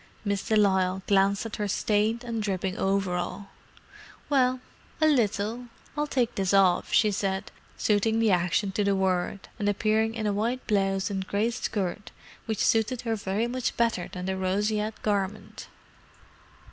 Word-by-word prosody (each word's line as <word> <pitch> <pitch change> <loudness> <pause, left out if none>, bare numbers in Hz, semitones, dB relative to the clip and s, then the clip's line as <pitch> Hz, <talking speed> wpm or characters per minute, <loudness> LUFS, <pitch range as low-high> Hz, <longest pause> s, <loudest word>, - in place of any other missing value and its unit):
Miss 200 -1 0
de 220 - 0
Lisle 190 -2 +2
glanced 200 +1 +2
at 225 - -5
her 210 - -1
stained 215 +4 +1
and 230 -2 -3
dripping 190 -2 -2
overall. 195 0 -1 0.8
"Well, 255 -2 +3 0.4
a 310 - +4
little. 230 -3 +1 0.3
I'll 295 0 -1
take 245 -5 0
this 195 0 +1
off," 185 -2 +3
she 215 -2 +4
said, 190 -1 -2 0.3
suiting 220 +1 +2
the 225 -2 +3
action 180 +3 +1
to 205 +1 0
the 200 0 +2
word, 190 0 -1
and 205 -1 +1
appearing 220 +2 +1
in 220 -2 -3
a 205 - +1
white 235 +5 -1
blouse 195 -1 +1
and 190 -1 -3
grey 215 +4 0
skirt 205 -4 -3 0.4
which 220 -2 0
suited 225 +2 +2
her 230 -2 -1
very 205 +2 -1
much 250 +1 -2
better 230 -6 0
than 180 0 -6
the 190 0 -1
roseate 210 +3 -1
garment. 205 -1 -2
205 Hz, 160 wpm, -27 LUFS, 190-225 Hz, 0.8 s, a